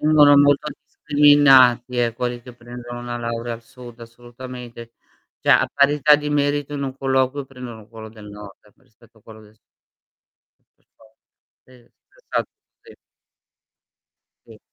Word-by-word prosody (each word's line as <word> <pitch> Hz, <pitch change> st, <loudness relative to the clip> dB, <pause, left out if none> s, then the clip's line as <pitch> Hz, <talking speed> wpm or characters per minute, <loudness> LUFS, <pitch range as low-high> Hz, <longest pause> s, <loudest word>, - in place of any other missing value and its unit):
Vengono 150 Hz, -2 st, +5 dB
molto 145 Hz, +1 st, +3 dB
discriminati 140 Hz, -4 st, +3 dB
eh, 120 Hz, -1 st, 0 dB
quelli 120 Hz, 0 st, -5 dB
che 125 Hz, -, -12 dB
prendono 120 Hz, 0 st, -10 dB
una 120 Hz, 0 st, -6 dB
laurea 115 Hz, 0 st, -5 dB
al 115 Hz, -, -13 dB
sud 125 Hz, -1 st, -14 dB
assolutamente. 120 Hz, 0 st, -11 dB, 0.5 s
Cioè -, -, -7 dB
a -, -, +3 dB
parità 145 Hz, +1 st, +4 dB
di 150 Hz, 0 st, -5 dB
merito 145 Hz, 0 st, -1 dB
in 140 Hz, -, -4 dB
un 135 Hz, -1 st, -5 dB
colloquio 135 Hz, +1 st, -1 dB
prendono 120 Hz, -5 st, -11 dB
quello 110 Hz, -1 st, -11 dB
del 110 Hz, -1 st, -14 dB
nord 105 Hz, -1 st, -12 dB, 0.2 s
rispetto 115 Hz, 0 st, -26 dB
a -, -, -28 dB
quello 110 Hz, 0 st, -14 dB
del 105 Hz, 0 st, -20 dB
s -, -, -35 dB, 1.2 s
Per -, -, -41 dB
forza. 110 Hz, 0 st, -24 dB, 0.5 s
Sì 130 Hz, -, -22 dB, 0.5 s
esatto, -, -, -3 dB, 0.3 s
sì. 450 Hz, -, -17 dB, 1.5 s
Sì. -, -, -16 dB
125 Hz, 145 wpm, -20 LUFS, 115-140 Hz, 1.5 s, Vengono